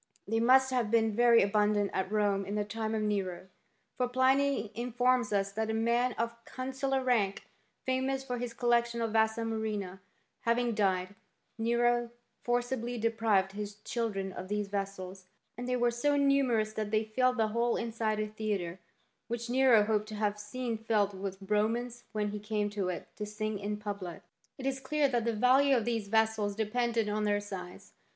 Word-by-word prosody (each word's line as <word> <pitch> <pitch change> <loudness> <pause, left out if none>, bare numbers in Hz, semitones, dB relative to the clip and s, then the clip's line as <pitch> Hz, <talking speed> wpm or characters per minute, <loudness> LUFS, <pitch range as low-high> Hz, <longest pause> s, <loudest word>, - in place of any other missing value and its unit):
* - - -36
They 225 +2 +1
must 260 +3 +5
have 245 -4 +1
been 225 -1 +2
very 235 -1 +6
abundant 205 0 +2
at 190 +1 -1
Rome 205 -2 +1
in 200 +2 -4
the 210 - +1
time 220 +1 -3
of 215 - -1
Nero; 190 -3 -2 0.5
for 250 - +1
Pliny 260 -2 +2
informs 245 0 +1
us 200 -1 +1
that 220 +2 -2
a 220 - 0
man 235 +2 +2
of 235 +1 -4
consular 265 +1 -2
rank, 215 -6 +1 0.4
famous 265 +1 0
for 250 -2 -4
his 245 -1 -3
collection 235 0 +1
of 230 -1 -1
vasa 220 0 +2
murrhina, 215 -4 -3 0.4
having 235 0 +1
died, 190 -3 0 0.5
Nero 240 +1 +2 0.3
forcibly 245 0 -1
deprived 220 -4 +1
his 205 0 -6
children 210 -3 -3
of 185 - -7
these 205 0 -2
vessels, 195 -2 -5 0.3
and 245 +2 -6
they 250 - +1
were 240 -1 +2
so 285 +5 +1
numerous 265 -6 +2
that 215 -1 -3
they 215 +1 +2
filled 250 +3 +1
the 220 -1 +2
whole 235 +2 +1
inside 225 -2 -1
of 215 0 -1
a - - -18
theatre, 200 -5 -3 0.5
which 235 0 -4
Nero 255 -4 +5
hoped 210 0 0
to 215 - -7
have 210 -1 -1
seen 230 +2 -4
.filled 210 -3 +1
with 190 0 -5
Romans 230 +3 0
when 210 -1 -1
he 210 0 -4
came 210 0 -2
to 200 -3 -2
it 180 - -5
to 210 - -3
sing 215 0 -3
in 205 +1 -3
public. 200 -5 -6 0.2
* - - -39
It 265 - -7
is 270 0 -1
clear 290 +2 +1
that 240 -3 0
the 230 - +1
value 260 +4 +5
of 230 - -1
these 230 -3 -1
vessels 220 -1 +1
depended 225 +1 0
on 210 +1 -1
their 205 -1 +2
size. 190 -3 -8
220 Hz, 185 wpm, -31 LUFS, 205-240 Hz, 0.5 s, very